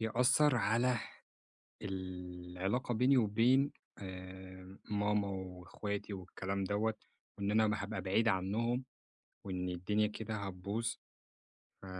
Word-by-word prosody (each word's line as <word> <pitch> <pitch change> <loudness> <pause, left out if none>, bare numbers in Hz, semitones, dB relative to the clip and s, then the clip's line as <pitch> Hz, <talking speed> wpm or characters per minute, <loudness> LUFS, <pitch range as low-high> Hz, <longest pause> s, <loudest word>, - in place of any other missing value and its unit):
يأثّر 125 +5 +4
على 120 +3 +3 0.8
العلاقة 95 +4 -3
بيني 125 +5 +5
وبين 125 +5 +4 0.3
آآ 95 0 -9
ماما 105 -1 +2
وأخواتي 95 +2 -4
والكلام 95 +1 -3
دوّة، 105 +3 +1 0.4
وإن 100 0 0
أنا 110 +1 +5
م 105 - +2
هابقى 100 -1 -3
بعيد 105 +5 +3
عنُّهم 115 +6 +1 0.6
وإن 90 -1 -2
الدنيا 95 +4 +1
كده 110 +1 -4
هتبوظ، 100 +3 -2 0.9
ف - - -10
100 Hz, 105 wpm, -35 LUFS, 95-110 Hz, 0.9 s, بيني